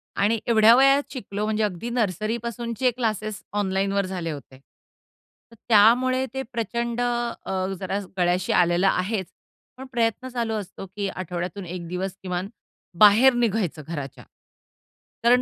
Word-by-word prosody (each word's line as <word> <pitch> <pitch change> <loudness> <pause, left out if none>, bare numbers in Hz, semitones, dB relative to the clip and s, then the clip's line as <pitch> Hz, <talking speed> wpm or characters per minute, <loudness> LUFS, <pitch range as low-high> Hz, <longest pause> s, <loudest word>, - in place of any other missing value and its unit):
आणि 215 +3 +2
एवढ्या 225 -1 +6
वयात 275 +2 +5
शिकलो 210 -5 -4
म्हणजे 215 0 0
अगदी 205 +2 -3
नर्सरीपासूनचे 235 +3 -1
क्लासेस 215 -3 -3 0.2
ऑनलाईनवर 195 0 0
झाले 180 -3 -4
होते. 135 -2 -10 0.9
तर 230 - -15
त्यामुळे 250 +4 +5
ते 265 - -2
प्रचंड 235 +1 -2
अ, 235 -6 -2
जरा 195 +1 -2 0.2
गळ्याशी 180 +1 +1
आलेलं 175 +2 +3
आहेच. 190 0 0 0.5
पण 265 - -8
प्रयत्न 235 +1 0
चालू 235 -3 -2
असतो, 200 -2 -6
की 200 +1 -4
आठवड्यातून 180 +1 -5
एक 175 -1 -6
दिवस 180 +2 -4
किमान 180 +1 -3 0.5
बाहेर 215 +6 +7
निघायचं 220 -9 0
घराच्या. 145 -5 -6 1.0
कारण 245 +2 +5
210 Hz, 130 wpm, -24 LUFS, 185-235 Hz, 1.0 s, बाहेर